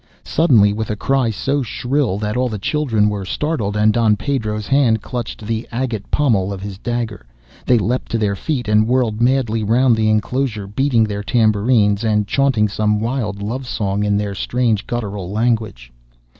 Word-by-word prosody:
Suddenly, 115 -11 +4
with 110 +1 -4
a 105 - -1
cry 130 +2 +1
so 135 +7 -1
shrill 125 -2 -1
that 105 0 -3
all 125 0 +1
the 110 - -4
children 115 -2 +1
were 105 -2 -2
startled 105 - -2
and 105 0 +3
Don 115 -3 +3
Pedro's 110 -4 -2
hand 125 -5 +2
clutched 120 -3 -5
at - - -8
the 115 +1 -3
agate 120 -4 -3
pommel 110 -10 +1
of 100 - -5
his 100 -2 -7
dagger, 115 - -3 0.4
they 125 - +5
leapt 120 +4 -1
to 115 - 0
their 105 -2 0
feet 125 - -3
and 105 +1 +3
whirled 120 -3 0
madly 120 -3 +1
round 120 +3 +3
the 110 -1 +1
enclosure 110 0 -1
beating 120 +3 +1
their 105 -1 -2
tambourines, 110 -1 +2
and 105 -2 +1
chaunting 130 -3 +2
some 105 +1 0
wild 110 -4 -3
love 125 +5 -4
song 100 -3 -1
in 100 -1 +1
their 105 -1 -2
strange 115 +1 -1
guttural 105 -6 -4
language. 110 - -1
110 Hz, 180 wpm, -19 LUFS, 105-125 Hz, 0.4 s, they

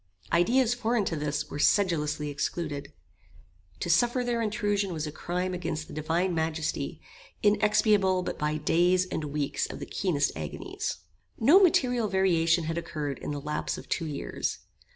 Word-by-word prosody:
Ideas 235 +8 +4
foreign 235 -3 0
to 165 - -1
this 150 -1 -2
were 145 - -5
sedulously 150 -6 +2
excluded. 145 -1 -3 0.9
To - - -2
suffer 240 +8 +3
their 240 -1 0
intrusion 205 -3 0
was 160 -1 -3
a 150 - -4
crime 180 +4 -3
against 160 -3 -3
the - - -10
Divine 165 +4 0
Majesty 160 -1 -2 0.4
inexpiable 210 -3 +3
but - - -4
by 150 +1 0
days 175 +4 +3
and 160 -4 -4
weeks 145 -1 -1
of - - -7
the - - -6
keenest 160 -7 0
agonies. 80 +1 -4 0.4
No 295 - +7
material 250 - +3
variation 170 -4 +2
had 165 +1 -2
occurred 145 -5 -4
in - - -6
the 145 -1 -3
lapse 150 +1 -3
of - - -11
two 165 - -1
years. 145 -2 -3
170 Hz, 155 wpm, -28 LUFS, 150-205 Hz, 0.9 s, No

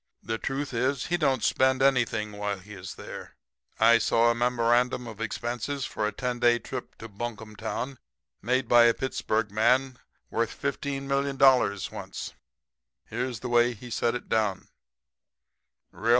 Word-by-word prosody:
The 115 0 -3
truth 140 0 -3
is, 130 +2 0
he 175 - 0
don't 135 -7 +1
spend 130 0 +3
anything 115 -5 +2
while 105 -1 -3
he 100 +3 -12
is 95 -2 -8
there. - - -9 0.4
I 115 +1 +6
saw 115 +1 +3
a - - +1
memorandum 120 +1 +1
of 115 -2 -9
expenses 120 +5 -3
for 105 - -2
a - - -2
ten 125 +1 -3
days 120 0 +4
trip 130 -2 -6
to 115 - -8
Bunkum 110 0 -6
Town 120 +5 -4 0.4
made 125 +3 0
by 120 0 +7
a 115 - +4
Pittsburg 110 -5 -1
man 125 +4 +2 0.3
worth - - -1
$15,000,000 135 - +1
once. - - -7 0.8
Here's 120 0 -3
the 125 - -4
way 120 0 +3
he 120 +3 -11
set 115 +1 0
it 125 - -6
down: 105 -4 0 1.2
R. - - -10
R. - - +3
120 Hz, 155 wpm, -27 LUFS, 110-130 Hz, 1.2 s, by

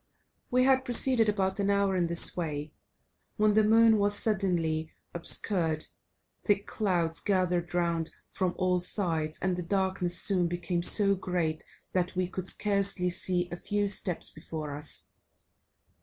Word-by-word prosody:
We 250 +1 +2
had 260 0 +3
proceeded 245 -2 +3
about 190 -1 -1
an 200 0 0
hour 200 -1 +1
in 175 -2 0
this 170 0 +4
way, 150 -3 -5 0.6
when 215 -1 +2
the 215 +1 +3
moon 225 0 +4
was 205 0 +4
suddenly 170 -7 -1 0.2
obscured; 165 -2 0 0.6
thick 205 -1 0
clouds 175 -6 -1
gathered 180 -3 -1
round 170 -2 -1 0.2
from 185 -2 -2
all 180 -1 +1
sides, 165 -4 -1
and 185 -1 0
the 180 - -4
darkness 185 -1 -1
soon 185 -4 +3
became 175 0 -3
so 200 +3 +4
great 175 -4 -3 0.3
that 180 0 -2
we 185 0 -1
could 185 0 -5
scarcely 200 -3 +2
see 180 0 +1
a - - -4
few 205 +3 -2
steps 195 -3 0
before 155 -2 -7
us. 150 +1 -1
185 Hz, 145 wpm, -28 LUFS, 170-200 Hz, 0.6 s, this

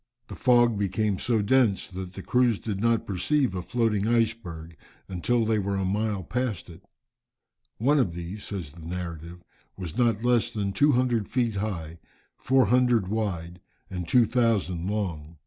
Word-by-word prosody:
The - - -7
fog 120 -1 +4
soon 110 - -4
became 100 0 0
so 115 -4 +1
dense, 115 -3 +2
that 95 -1 -7
the 95 - -8
crews 125 -3 +2
did 100 -2 -4
not 115 0 +2
perceive 125 +7 0
a 90 - -3
floating 110 0 0
iceberg, 110 -9 -1 0.3
until 110 +6 0
they 110 -1 +1
were 100 0 -1
a 95 -1 -1
mile 100 0 -1
past 120 -2 -3
it. 80 - -14 1.0
"One 140 +6 +3
of 95 -10 +1
these," 85 +4 -6
says 90 -8 -5
the 85 +2 -13
narrative, 85 -1 -6 0.3
"was 95 +4 -6
not 115 -3 +2
less 120 -1 +2
than 100 -3 -2
200 125 -3 +2
feet 120 -5 0
high, 85 -6 -4 0.4
400 125 -5 +3
wide, 90 -5 -3 0.3
and 90 -2 -4
2000 110 -6 +2
long. 85 -7 -4
105 Hz, 155 wpm, -26 LUFS, 90-120 Hz, 1.0 s, fog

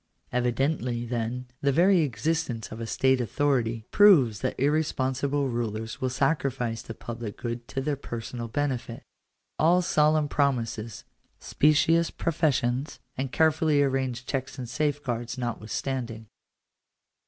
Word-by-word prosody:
Evidently, 125 0 0
then, 120 +1 -3 0.2
the 140 - +3
very 180 +6 +5
existence 140 -3 -1
of 110 +1 -7
a 115 - -4
state 130 +2 +2
authority 120 -3 0
proves 150 - +6
that 130 - -3
irresponsible 140 -1 +1
rulers 110 -2 -3
will 130 - +1
sacrifice 130 -4 0
the 115 -2 -8
public 115 -2 -7
good 120 0 -5
to 135 - -3
their 145 +1 -1
personal 120 -2 -6
benefit; 125 -2 -3 0.6
all 175 +3 +4
solemn 155 -2 +3
promises, 120 -6 -1 0.4
specious 160 +3 +3
professions, 140 -4 0 0.2
and 130 0 -3
carefully 155 -1 +3
arranged 130 -2 -1
checks 135 -1 -3
and 125 -2 -5
safeguards, 130 -4 -2
notwithstanding. 120 0 -3
130 Hz, 120 wpm, -27 LUFS, 120-145 Hz, 0.6 s, proves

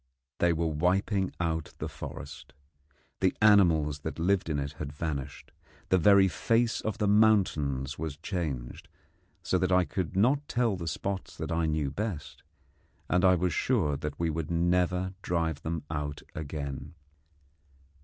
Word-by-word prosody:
They 85 - +4
were 85 0 0
wiping 95 +5 +1
out 80 -2 -2
the - - -4
forest: 75 +2 -9 0.7
the 95 -1 +1
animals 85 -9 +4
that 80 +2 -5
lived 90 +1 +1
in 75 - 0
it 70 0 -3
had 70 -1 -4
vanished: 70 -3 -5 0.4
the 95 - +4
very 100 +2 +6
face 115 +5 +1
of 110 -2 -3
the 105 - +1
mountains 80 -11 +2
was 80 -2 -4
changed, 75 -9 -4 0.6
so 95 - +1
that 95 0 0
I 90 -1 +4
could 90 -1 -3
not 135 +9 +2
tell 120 -4 +1
the 85 -2 -6
spots 95 +4 -4
that - - -4
I 80 0 +1
knew 75 -3 0
best; 95 -3 -5 0.7
and 90 +1 +3
I 95 -1 +6
was 90 -1 0
sure 90 - +1
that 75 0 -5
we 85 -1 +1
could 80 -1 -3
never 90 +2 +1
drive 80 -4 -1
them 80 -2 -3
out 75 -1 -4
again. 70 -1 -5
85 Hz, 155 wpm, -29 LUFS, 75-95 Hz, 0.7 s, very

